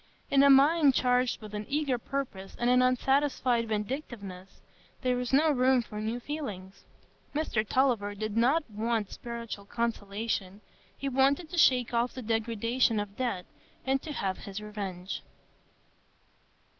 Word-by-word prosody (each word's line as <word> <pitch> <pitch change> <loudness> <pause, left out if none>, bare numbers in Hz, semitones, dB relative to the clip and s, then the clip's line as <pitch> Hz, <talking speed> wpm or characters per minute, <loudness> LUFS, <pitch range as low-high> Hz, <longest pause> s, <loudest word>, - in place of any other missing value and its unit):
In 275 -1 +6
a 280 - +7
mind 280 +1 +6
charged 250 -2 +1
with 210 -1 -9
an 210 0 -5
eager 280 -3 0
purpose 235 -8 -5
and 240 +1 +2
an 250 0 +5
unsatisfied 255 -2 +2
vindictiveness, 210 -4 -5 0.4
there 250 -1 +1
is 250 -1 -3
no 305 +4 +4
room 255 -2 +3
for 210 -1 -7
new 225 +3 -2
feelings; 210 -10 -6 0.5
Mr 295 -8 0
Tulliver 225 -4 +1
did 215 0 -4
not 265 +8 +3
want 220 -1 -2
spiritual 235 -4 -6
consolation—he 210 +1 -4
wanted 275 +5 +2
to 350 - -5
shake 250 -5 +4
off 235 +1 +1
the 255 - -7
degradation 230 +1 +1
of 205 -1 -5
debt, 235 -8 -2 0.4
and 265 0 +1
to 310 - -7
have 195 -9 -2
his 200 0 -6
revenge. 200 -3 -5
235 Hz, 140 wpm, -29 LUFS, 210-265 Hz, 0.5 s, a